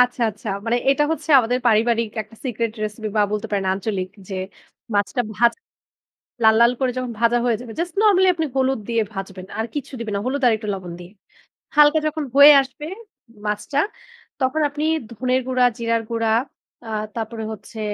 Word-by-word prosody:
আচ্ছা, 250 0 +2
আচ্ছা। 210 +1 -9 0.2
মানে 235 +1 +2
এটা 295 +2 +3
হচ্ছে 320 - -5
আমাদের 245 0 +1
পারিবারিক 230 0 +2
একটা 215 +2 -19
সিক্রেট 230 -3 -2
রেসিপি 215 +1 -5
বা 210 - +5
বলতে 210 +1 -2
পারেন 200 -2 -1
আঞ্চলিক। 190 -1 -3 0.2
যে, 195 - -5 0.6
মাছটা 205 +4 +1
ভাজ। 235 +2 +4 0.9
লাল, 220 0 +6
লাল 235 +1 +6
করে 260 -1 +1
যখন 255 -1 -3
ভাজা 235 +1 +4
হয়ে 230 -3 +2
যাবে। 240 -2 -9
জাস্ট 345 0 -2
নরমালি 380 -3 +5
আপনি 320 -2 -2
হলুদ 265 -2 +1
দিয়ে 230 -1 +2
ভাজবেন। 190 -1 -7
আর 225 - 0
কিচ্ছু 285 -1 -5
দিবেন 220 -3 -4
না। - - 0
হলুদ 275 +2 -1
আরেকটু 220 -2 0
লবণ 185 -2 -6
দিয়ে। 175 +1 -11 0.7
হালকা 300 +1 +6
যখন 310 0 -2
হয়ে 285 +1 +10
আসবে 270 +3 -8 0.6
মাছটা, 210 +7 -1 0.6
তখন 260 +4 +1
আপনি 290 +1 -4 0.3
ধনিয়ার 255 +3 0
গুঁড়া, 255 -1 +3
জিরার 230 -1 0
গুঁড়া, 230 -1 0 0.6
আ - - -6 0.3
তারপরে 225 0 -4
হচ্ছে 220 +1 -9
235 Hz, 175 wpm, -21 LUFS, 215-260 Hz, 0.9 s, হয়ে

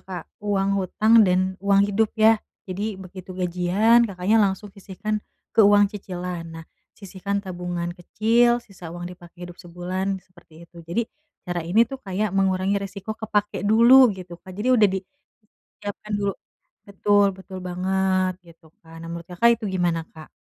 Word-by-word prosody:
Kak. 185 -2 -7 0.2
Uang 200 -1 0
hutang 215 +4 +4
dan 185 +1 +1
uang 200 0 +4
hidup, 205 +2 +1
ya. 220 0 +5 0.2
Jadi 200 +2 -4
begitu 185 0 -10
gajian, 185 +6 +3
Kakaknya 195 +3 +2
langsung 200 0 -1
sisihkan 205 +2 -4 0.3
ke - - +4
uang 205 -1 +6
cicilan. 180 -4 -6
Nah, 165 0 -9 0.3
sisihkan 200 0 -4
tabungan 175 -2 -4
kecil, 230 +6 +2
sisa 185 -4 -12
uang 175 0 -6
dipakai 175 0 -12
hidup 175 0 -12
sebulan, 185 +2 -3
seperti 170 -2 -18
itu. 170 0 -17
Jadi 170 +8 -1 0.4
cara 175 -1 -3
ini 180 +8 +3
tuh 270 +3 -8
kayak 200 0 -2
mengurangi 195 0 +1
resiko 200 +2 -6
kepake 210 -2 -2
dulu, 240 +4 +7
gitu, 175 -2 -10
Kak. 190 - -13
Jadi 225 +5 -2
udah 220 -5 +5 0.7
disiapkan 205 +1 -9
dulu 200 -1 -1 0.6
betul, 205 +1 +3
betul 190 0 -9
banget, 185 +1 0
gitu. 165 -1 -19
kan. 165 0 -13
Nah, 165 - -8
menurut 170 0 -8
Kakak 180 +7 +3
itu 220 - -8
gimana, 175 -3 0
Kak? 155 -1 -13
190 Hz, 155 wpm, -23 LUFS, 180-210 Hz, 0.7 s, dulu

